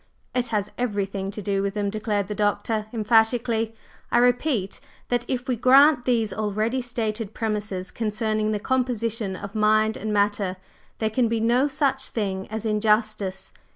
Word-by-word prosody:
"It 250 -1 +1
has 210 -2 -1
everything 200 -4 -2
to 205 +1 -6
do 195 0 0
with 200 +1 -2
them," 205 -1 -1
declared 215 -1 -1
the 210 - -4
Doctor 210 +1 0
emphatically, 225 0 +2 0.4
"I - - +3
repeat 245 -4 +1 0.3
that 245 -1 +1
if 255 -1 -3
we 255 - +1
grant 260 +2 +5
these 230 -4 +1
already 215 +4 -1
stated 225 -3 -3
premises 210 -4 -2
concerning 215 -1 -1
the 210 -1 -1
composition 230 -5 -1
of 200 +1 -8
Mind 215 0 +3
and 215 - -3
Matter, 205 -2 +1 0.4
there 220 -1 -1
can 240 +2 +2
be 230 0 0
no 240 +5 +3
such 270 -2 0
thing 195 -4 -3
as 220 +1 -3
injustice. 215 -2 +1
220 Hz, 155 wpm, -24 LUFS, 205-240 Hz, 0.4 s, grant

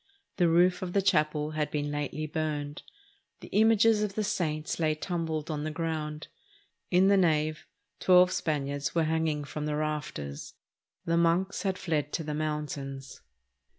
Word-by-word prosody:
The 175 -3 +4
roof 180 +3 +4
of 180 -1 -4
the 200 - +3
chapel 150 -3 +1
had 155 -1 -1
been 145 -1 -2
lately 145 +1 -3
burned. 150 -2 -3 0.6
The - - -10
images 220 0 +4
of 205 -2 -2
the 215 - 0
saints 155 -6 -2
lay 155 -2 +2
tumbled 160 -2 -3
on 150 -1 -3
the 155 - -2
ground. 155 -1 -3 0.6
In 185 +2 +4
the 200 0 +5
nave 155 -3 +1 0.3
twelve 180 0 +6
Spaniards 145 -3 -2
were 165 - +3
hanging 160 -2 0
from 150 +1 -5
the 150 - -1
rafters. 150 - -4 0.5
The 170 0 +1
monks 170 +3 +2
had 190 -2 -1
fled 150 -4 -1
to 165 - -1
the 150 0 -4
mountains. 150 -3 -4
155 Hz, 155 wpm, -29 LUFS, 150-175 Hz, 0.6 s, twelve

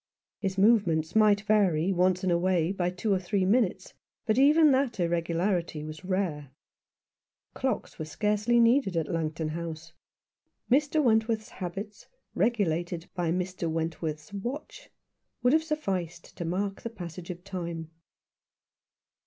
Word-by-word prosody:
His 195 -1 -2
movements 190 -6 +3
might 210 -2 +5
vary 195 -5 +2
once 185 +1 +2
in 185 - +1
a 170 - +3
way 180 -2 +1
by 180 -3 0
two 185 +4 -1
or 190 - +2
three 185 +1 0
minutes, 215 0 +1 0.3
but 220 +2 +2
even 300 +2 +6
that 260 -5 +1
irregularity 170 -1 0
was 155 +2 -8
rare. 180 -7 -2 1.0
Clocks 260 -7 -3
were 155 - -3
scarcely 210 +8 +1
.needed 230 -5 +3
at 160 -2 0
Langton 160 -1 -2
House; 165 0 -6 0.8
Mr. 295 +3 +3
Went 220 -3 +3
worth's 220 -2 -2
habits, 200 +3 -7 0.3
regulated 175 -6 0
by 175 -2 -1
Mr. 180 -1 -2
Wentworth's 160 0 -3
watch, 240 +9 -6 0.5
would 250 +2 +4
have 315 - +5
sufficed 190 - -3
to 170 - -5
mark 195 +4 -2
the 230 - -4
passage 180 -5 -8
of 175 0 -7
time. 170 -4 -5
185 Hz, 135 wpm, -28 LUFS, 170-215 Hz, 1.0 s, even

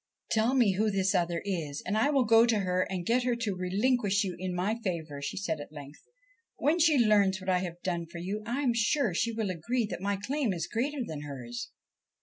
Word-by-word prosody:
' - - -22
Tell 225 +4 +2
me 240 -6 +4
who 215 +1 +2
this 195 -1 +1
other 175 -2 0
is, 160 -8 -3
and 200 - -1
I 225 +6 +3
will 275 -3 +3
go 225 +1 +6
to 220 -3 +2
her 185 -1 0
and 180 -2 -3
get 240 +5 +2
her 245 -1 +1
to 225 -5 -2
relinquish 205 +3 +1
you 185 -3 -3
in 185 -1 -3
my 205 +6 -1
favour,' 160 -6 -3
she 140 - -4
said 165 -5 -2
at 145 - -10
length. 145 -1 -11 0.3
' 465 -2 -45
When 315 +4 +2
she 315 -3 +5
learns 205 -5 +4
what 190 0 -2
I 180 - +3
have 175 -2 -5
done 170 -2 -2
for 170 - -10
you, 195 +5 -3
I 240 +5 -2
am 255 -4 +2
sure 230 - +1
she 230 +7 0
will 220 -4 -2
agree 230 +8 -1
that - - -5
my 200 0 0
claim 250 +2 -1
is 170 -2 -3
greater 260 +8 -2
than 155 -6 -6
hers.' 125 -5 -6
195 Hz, 240 wpm, -29 LUFS, 175-235 Hz, 0.3 s, go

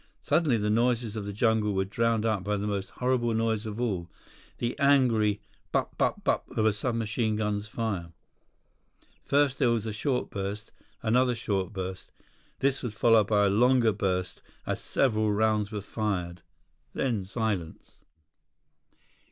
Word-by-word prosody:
Suddenly, 150 -8 +2
the 105 0 0
noises 120 -1 +1
of 105 -2 -4
the - - -3
jungle 105 -1 +1
were 95 0 +1
drowned 115 +2 0
out 110 -4 0
by 105 +2 -1
the 100 - -3
most 100 -2 -2
horrible 125 -2 0
noise 110 -1 0
of 105 +1 -5
all—the 120 +3 -5
angry, 120 -8 +3 0.3
"bup, - - -1
bup, - - 0
bup" - - +2 0.2
of 110 - +3
a 110 - +4
sub 115 +4 -2
machine 110 0 0
gun's 105 -1 -1
fire. 100 -7 -3 1.1
First 140 -1 +2
there 130 -4 +4
was 115 -2 0
a 110 - -3
short 125 +5 -1
burst. 100 +1 -5 0.3
Another 125 +2 +3
short 100 -4 -2
burst. 95 -2 -6 0.5
This 135 0 +1
was 120 -4 -5
followed 115 -3 +4
by 105 -1 +3
a - - +3
longer 120 +2 +4
burst 95 -3 -2 0.2
as - - -2
several 110 -5 +1
rounds 105 0 +1
were 105 -2 -3
fired. 90 -5 -3 0.5
Then, 115 -7 0
silence. 100 -5 -4
110 Hz, 150 wpm, -28 LUFS, 100-120 Hz, 1.1 s, a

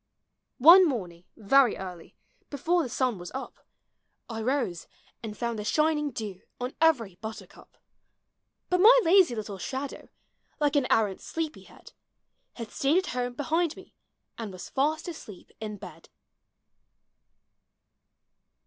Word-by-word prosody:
One 340 +7 +9
morning, 180 - -5
very 245 +3 +4
early, 180 -3 -9 0.3
before 335 +5 +1
the 260 - -4
sun 245 -4 -1
was 175 - -8
up, 265 - -8 0.6
I 225 -2 -5
rose 230 - -1 0.3
and 215 -2 -7
found 235 -2 -3
the - - -4
shining 300 +5 +1
dew 210 -8 -6 0.2
on 250 +1 -4
every 235 - +2
butter 220 +2 -7
cup; - - -19 0.9
Hut 360 0 +3
my - - +8
lazy 355 -7 +5
little 205 -3 -6
shadow, 270 +6 -5 0.5
like 295 -1 +1
an 280 -3 +2
arrant 205 -4 +1
sleepy 320 -2 -5
head. - - -16 0.6
Had 230 -2 -8
stayed 280 +5 +1
at 375 - +1
home 245 0 -2
behind 320 +4 0
me - - -15 0.5
and 220 -3 -5
was 185 -1 -9
fast 305 +4 0
asleep 250 - -10
in 215 -1 -6
bed. 195 - -12
250 Hz, 135 wpm, -27 LUFS, 215-310 Hz, 0.9 s, One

